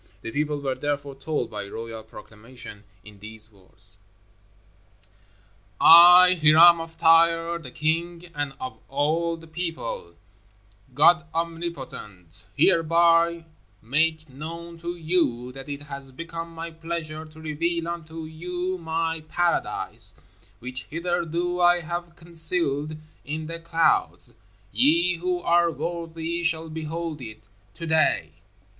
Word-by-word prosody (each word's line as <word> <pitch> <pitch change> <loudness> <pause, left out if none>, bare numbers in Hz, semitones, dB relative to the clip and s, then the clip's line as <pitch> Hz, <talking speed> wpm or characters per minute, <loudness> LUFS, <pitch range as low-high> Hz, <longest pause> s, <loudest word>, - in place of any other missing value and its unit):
The 115 - -5
people 150 +2 -1
were 135 -2 -1
therefore 145 0 -3
told, 135 -3 -3
by 105 -2 -5
royal 115 +1 -7
proclamation, 110 0 -12 0.2
in 105 -2 -14
these 110 +1 -6
words: 95 0 -12 1.8
I, 180 +2 +9
Hiram 165 +3 +7
of 165 0 -10
Tyre, 165 +1 +4
the 145 -6 -10
King, 165 +5 -2
and 145 -2 -3
of 130 0 -7
all 160 +4 0
the 165 - -14
People, 160 - -5 0.8
GOD 170 +4 +5
OMNIPOTENT, 135 - -6
Hereby 170 - +3 0.4
make 155 +6 +1
known 165 +5 -8
to 170 +1 -5
you 155 -8 0
that 135 +2 -10
it 140 0 -5
has 140 -2 -9
become 165 +4 -7
my 165 0 -7
pleasure 160 -1 -5
to 155 0 -15
reveal 165 +2 -2
unto 165 -1 -6
you 180 +3 -4
my 165 0 -2
PARADISE 175 +1 -1 0.4
which 125 +2 -5
hitherto 175 +1 -2
I 175 0 +5
have 170 +1 -5
concealed 160 -3 0 0.3
in 155 +2 -4
the 165 +1 -6
clouds. 165 0 0 0.4
Ye 165 - +3
who 180 +1 -2
are 170 0 +3
worthy 165 +1 -4
shall 165 -1 0
behold 160 -1 -5
it 110 -3 -10 0.3
TODAY! 160 - +1
160 Hz, 120 wpm, -25 LUFS, 140-170 Hz, 1.8 s, I